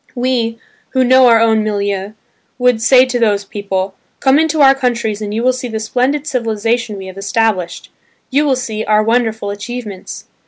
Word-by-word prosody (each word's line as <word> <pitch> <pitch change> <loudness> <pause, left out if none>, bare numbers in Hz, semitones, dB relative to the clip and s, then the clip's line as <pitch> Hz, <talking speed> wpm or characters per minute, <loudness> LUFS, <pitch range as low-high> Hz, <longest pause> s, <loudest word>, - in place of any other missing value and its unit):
We, 245 -2 -1 0.4
who 260 - +3
know 260 0 +5
our 230 -1 +5
own 220 -1 +3
milieu, 200 -1 -2 0.4
would 250 -3 +2
say 255 +2 +5
to 250 -1 -2
those 205 -3 +1
people, 195 -2 -3 0.3
"Come 270 +2 +3
into 320 -1 +1
our 270 -1 +7
countries 235 -5 -2
and 205 -1 -4
you 225 +3 -2
will 255 +1 +3
see 255 0 -5
the 220 -2 -4
splendid 255 +6 -1
civilisation 230 -4 -2
we 190 - -8
have 190 +1 -9
established, 200 -4 -1 0.4
you 285 +3 +2
will 280 -3 +2
see 220 -4 -4
our 215 0 +2
wonderful 220 -2 0
achievements." 210 -1 -7
225 Hz, 180 wpm, -15 LUFS, 210-255 Hz, 0.4 s, our